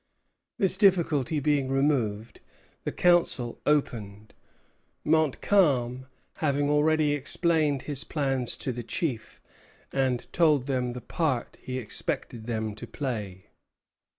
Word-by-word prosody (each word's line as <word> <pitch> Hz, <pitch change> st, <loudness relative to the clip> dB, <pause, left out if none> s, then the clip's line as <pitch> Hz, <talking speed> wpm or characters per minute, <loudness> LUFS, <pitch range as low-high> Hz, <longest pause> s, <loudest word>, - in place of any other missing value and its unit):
This 190 Hz, -1 st, +2 dB
difficulty 165 Hz, -, +3 dB
being 145 Hz, -2 st, +1 dB
removed, 120 Hz, -6 st, 0 dB, 0.5 s
the -, -, -1 dB
council 170 Hz, -9 st, +2 dB
opened, 110 Hz, -8 st, -1 dB, 0.7 s
Montcalm 145 Hz, -5 st, +2 dB, 0.3 s
having 145 Hz, -1 st, +1 dB
already 150 Hz, 0 st, +3 dB
explained 145 Hz, 0 st, 0 dB
his 145 Hz, -1 st, -2 dB
plans 135 Hz, -5 st, -1 dB
to 130 Hz, -, -2 dB
the 120 Hz, 0 st, -5 dB
chiefs 120 Hz, 0 st, -4 dB, 0.5 s
and 130 Hz, -3 st, 0 dB
told 155 Hz, -6 st, +3 dB
them 125 Hz, -3 st, -1 dB
the 125 Hz, -, -7 dB
part 130 Hz, 0 st, -2 dB
he 130 Hz, 0 st, -5 dB
expected 115 Hz, -1 st, -3 dB
them 110 Hz, -2 st, -2 dB
to -, -, -8 dB
play. 105 Hz, -9 st, -5 dB
135 Hz, 110 wpm, -27 LUFS, 120-150 Hz, 0.7 s, difficulty